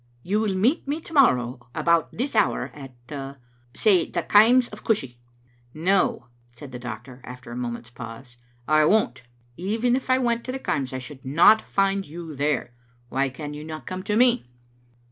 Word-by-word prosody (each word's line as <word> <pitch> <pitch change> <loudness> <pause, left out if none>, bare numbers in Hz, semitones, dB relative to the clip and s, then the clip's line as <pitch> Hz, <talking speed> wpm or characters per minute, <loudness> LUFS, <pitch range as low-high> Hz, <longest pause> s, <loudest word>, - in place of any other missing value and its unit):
You 205 +4 0
will 210 -3 0
meet 245 - +1
me 290 +3 -1
to 330 - -13
morrow 125 - +3
about 170 -1 +2
this 255 +2 -3
hour 215 - +1
at 135 -3 -11 0.6
— 120 0 -35
say 190 -6 +3
the 170 - -2
Kaims 235 +7 +5
of - - -10
Cushie?" 135 - -1 0.6
"No," 180 -5 +1 0.3
said 130 +3 -12
the 125 - -7
doctor 125 +2 -8
after 125 -1 -10
a - - -6
moment's 120 -1 -5
pause; 120 +1 -10 0.3
"I 155 0 +4
won't. 220 - +2 0.4
Even 225 +7 0
if 260 0 -4
I 255 - +5
went 235 -2 0
to 255 - -3
the 265 - -3
Kaims 135 - -2
I 130 - -4
should 130 +1 -10
not 170 +11 +5
find 195 0 0
you 165 +1 -8
there. 140 -3 -1 0.4
Why 135 +1 0
can 145 +3 -7
you 150 +1 -7
not 155 0 -8
come 185 0 -5
to 210 - 0
me?" 245 0 +4
160 Hz, 185 wpm, -24 LUFS, -, 0.6 s, Kaims